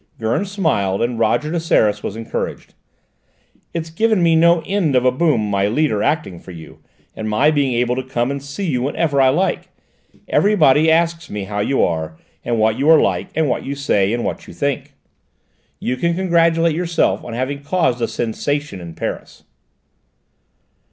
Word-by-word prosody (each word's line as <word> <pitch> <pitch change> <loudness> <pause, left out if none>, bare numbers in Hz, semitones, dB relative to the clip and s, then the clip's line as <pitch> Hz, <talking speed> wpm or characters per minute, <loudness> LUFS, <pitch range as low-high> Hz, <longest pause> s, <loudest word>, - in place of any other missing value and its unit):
Gurn 115 - -1
smiled 150 - 0
and 120 -1 -2
Roger 150 +6 +1
de 170 - 0
Seras 105 -10 +2
was 100 - -5
encouraged. 115 0 -5 1.0
"It's 165 -1 -5
given 215 +2 +1
me 165 -1 +4
no 170 0 +4
end 190 -8 0
of 125 0 +3
a 125 - +5
boom, 130 -6 +1
my 100 -1 +1
leader 115 -2 0
acting 105 - -1
for - - -15
you, 85 -3 -11 0.4
and 110 0 -4
my 110 +9 +3
being 140 -4 +1
able 125 +1 +1
to 130 - -2
come 130 -1 -2
and 140 0 -4
see 140 +8 -6
you 130 -6 0
whenever 140 +1 0
I 130 - +5
like! 175 +8 0 0.6
Everybody 160 -7 +4
asks 165 0 +1
me 105 -1 -4
how 100 +1 -4
you 135 +6 +1
are, 80 -1 -2 0.3
and 120 -1 -1
what 110 +1 +1
you 145 +3 +2
are 160 -1 +8
like, - - 0
and 160 -1 +1
what 125 - -1
you 140 - -4
say, 105 -8 +1
and 120 0 -1
what - - -4
you - - -11
think. 140 -1 -3 0.8
You 125 - -2
can 170 +5 0
congratulate 170 -3 +2
yourself 170 -1 0
on 120 - -7
having 130 +4 -3
caused 145 -5 0
a 115 - +1
sensation 120 -1 -3
in 85 -1 -9
Paris." - - -6
140 Hz, 180 wpm, -19 LUFS, 115-165 Hz, 1.0 s, are